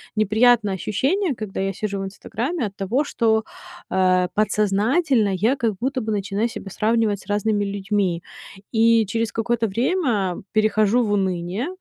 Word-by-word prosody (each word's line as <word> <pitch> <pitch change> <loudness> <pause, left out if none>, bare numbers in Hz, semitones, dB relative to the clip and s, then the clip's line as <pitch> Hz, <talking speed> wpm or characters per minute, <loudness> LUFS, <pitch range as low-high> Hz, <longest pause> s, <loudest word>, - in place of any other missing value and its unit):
неприятное 215 0 +3
ощущение, 270 - 0
когда 215 -3 -6
я 195 0 0
сижу 200 +1 -4
в - - -3
Инстаграме, 230 - -3
от 200 -2 -6
того, 220 +10 0
что, 225 -5 +1 0.5
э, 185 -1 +3
подсознательно 215 - +2
я 220 +8 +2
как 230 -5 0
будто 260 +1 -1
бы 220 -1 -3
начинаю 205 +2 -1
себя 205 -4 -8
сравнивать 220 -1 +1
с - - -19
разными 205 0 0
людьми. 200 -3 -1 0.5
И 230 0 +4
через 225 +3 -2
какое-то 230 0 0
время 230 - 0
перехожу 215 +2 +2
в 210 - -1
уныние 190 - -1
215 Hz, 145 wpm, -22 LUFS, 195-235 Hz, 0.5 s, И